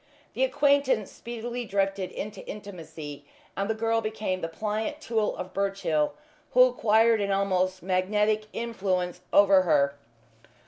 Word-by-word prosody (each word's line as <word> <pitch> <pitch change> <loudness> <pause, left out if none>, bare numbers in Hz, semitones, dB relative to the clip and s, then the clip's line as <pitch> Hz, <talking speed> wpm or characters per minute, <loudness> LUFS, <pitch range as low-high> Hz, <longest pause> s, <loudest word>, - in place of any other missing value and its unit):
The 260 - 0
acquaintance 270 -4 +2
speedily 240 +1 -5
drifted 195 -3 -1
into 210 -1 -6
intimacy, 165 -8 -8 0.3
and 200 +2 -2
the 220 - +1
girl 225 +1 +1
became 215 -4 -3
the 165 - -2
pliant 215 - -3
tool 225 -7 -1
of 185 0 -6
Birchill, 195 -6 0 0.4
who 250 - +8
acquired 225 -2 +3
an 200 - -1
almost 185 -2 0
magnetic 210 +4 +1
influence 185 -6 -2
over 200 -1 +6
her. 145 -5 +2
205 Hz, 130 wpm, -27 LUFS, 185-225 Hz, 0.4 s, who